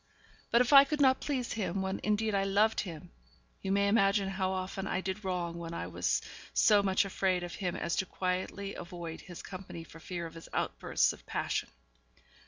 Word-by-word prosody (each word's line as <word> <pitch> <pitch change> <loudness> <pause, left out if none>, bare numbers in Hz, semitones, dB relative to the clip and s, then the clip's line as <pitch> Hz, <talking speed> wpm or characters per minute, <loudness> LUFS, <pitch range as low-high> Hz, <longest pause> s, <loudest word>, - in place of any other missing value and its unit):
But 235 - +5
if 250 +3 +2
I 275 0 +11
could 295 +2 -2
not 265 -2 +5
please 260 -5 -2
him 190 -3 -1
when 190 0 -2
indeed 215 +1 +1
I 195 -1 +2
loved 205 +3 +3
him, 165 -6 -6 0.5
you 190 - -2
may 200 0 +3
imagine 200 -1 +3
how 190 -1 -1
often 190 +1 -3
I - - 0
did 190 +2 -4
wrong 175 -2 -2
when 170 0 -5
I - - -3
was - - 0 0.3
so 210 -2 +6
much 195 0 +2
afraid 185 -2 0
of 175 - -6
him 180 -4 -2
as 170 - -1
to 190 - 0
quietly 185 +2 -2
avoid 170 -2 -7
his 175 -2 -10
company 185 -3 -8
for 165 0 -13
fear 170 +1 -5
of 165 - -8
his 165 - -11
outbursts - - +1
of - - -15
passion. - - -1
190 Hz, 195 wpm, -31 LUFS, 175-205 Hz, 0.5 s, I